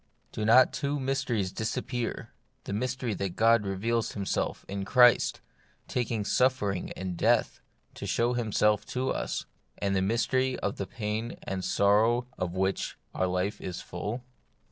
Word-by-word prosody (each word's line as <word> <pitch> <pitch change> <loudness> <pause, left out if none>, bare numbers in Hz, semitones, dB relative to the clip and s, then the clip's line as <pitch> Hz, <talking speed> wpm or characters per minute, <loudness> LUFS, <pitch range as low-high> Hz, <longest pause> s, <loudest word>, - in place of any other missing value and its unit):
Do 110 - -3
not 125 +4 +6
two 140 +1 -1
mysteries 130 -8 -1
disappear: 120 +3 -3 0.3
the - - -5
mystery 125 +1 -1
that 95 -2 -3
God 115 -2 +4
reveals 115 +4 -1
Himself 100 -1 -2
in 100 0 -3
Christ, 125 +3 +5 0.5
taking 115 -4 -1
suffering 105 -7 +1
and 95 -1 -4
death - - +2 0.3
to - - -6
show 120 +1 +1
Himself 105 -3 +2
to 130 +1 -1
us; - - -2 0.3
and 100 -1 0
the 95 - +2
mystery 125 +5 +1
of 100 - -3
the 100 - -3
pain 110 +2 -3
and 95 -1 -3
sorrow 110 +6 +3
of 90 0 -2
which 95 +1 -1 0.2
our 95 - 0
life 90 +3 -1
is 90 -1 -5
full 105 +8 -5
110 Hz, 145 wpm, -29 LUFS, 95-125 Hz, 0.5 s, not